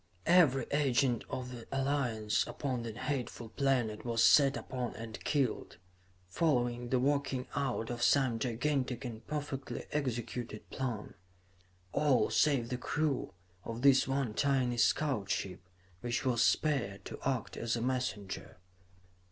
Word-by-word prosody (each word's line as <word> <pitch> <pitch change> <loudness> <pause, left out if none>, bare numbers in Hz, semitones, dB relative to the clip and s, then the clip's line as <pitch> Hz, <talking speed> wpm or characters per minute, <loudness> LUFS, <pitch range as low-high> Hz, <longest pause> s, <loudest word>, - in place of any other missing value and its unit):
"Every 160 -7 +5
agent 135 -4 +2
of 125 -1 -4
the 120 -2 -9
Alliance 125 -6 +1
upon 130 -4 -3
that 115 -1 -6
hateful 125 -5 -3
planet 120 -4 0
was 115 -1 +1
set 140 +2 +6
upon 125 -2 -4
and 115 -1 -8
killed, 135 - -1 0.5
following 120 - 0
the 130 - +2
working 135 -1 0
out 130 -5 -1
of 120 0 -4
some 130 -3 +3
gigantic 130 +1 -1
and 115 -2 -6
perfectly 145 -2 -4
executed 120 -5 -3
plan 120 -6 -3 0.8
all 135 -7 +3
save 135 -6 +3
the 125 - -2
crew 145 - -1 0.3
of 115 +2 -6
this 135 -2 +6
one 135 -4 0
tiny 130 -2 +1
scout 125 -5 +2
ship, 90 -2 -2 0.4
which 120 +3 -2
was 120 -3 +2
spared 130 -10 +1
to - - -7
act 130 -3 -1
as 115 0 -1
a - - -2
messenger. 125 -9 -3
125 Hz, 135 wpm, -33 LUFS, 115-140 Hz, 0.8 s, set